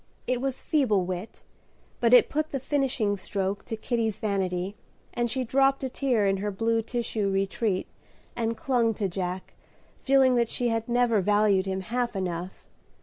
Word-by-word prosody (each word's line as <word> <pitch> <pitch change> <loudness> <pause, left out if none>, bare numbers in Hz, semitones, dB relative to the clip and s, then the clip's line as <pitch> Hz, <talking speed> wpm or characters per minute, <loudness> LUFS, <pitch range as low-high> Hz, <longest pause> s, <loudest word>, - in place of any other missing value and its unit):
It 250 -1 -1
was 270 -1 -3
feeble 215 - +2
wit, 185 +3 -6 0.6
but 235 -1 +3
it 250 - +7
put 310 +1 -1
the 275 - -3
finishing 260 -6 0
stroke 195 +1 -3
to 225 - -4
Kitty's 225 -2 -1
vanity, 190 -2 -2 0.4
and 240 0 0
she 260 +3 -1
dropped 270 +2 +2
a 260 - -1
tear 245 -5 +1
in 195 0 +2
her 205 +2 -2
blue 225 +3 0
tissue 225 -3 -2
retreat, 195 0 0 0.5
and 230 -1 -1
clung 235 -4 +1
to 200 - -1
Jack, 185 0 -4 0.5
feeling 265 -1 +4
that 235 -1 +2
she 245 -1 0
had 225 0 -2
never 240 -3 +3
valued 205 -1 +3
him 190 0 -2
half 240 +4 -2
enough. 180 -1 -4
225 Hz, 165 wpm, -27 LUFS, 195-245 Hz, 0.6 s, it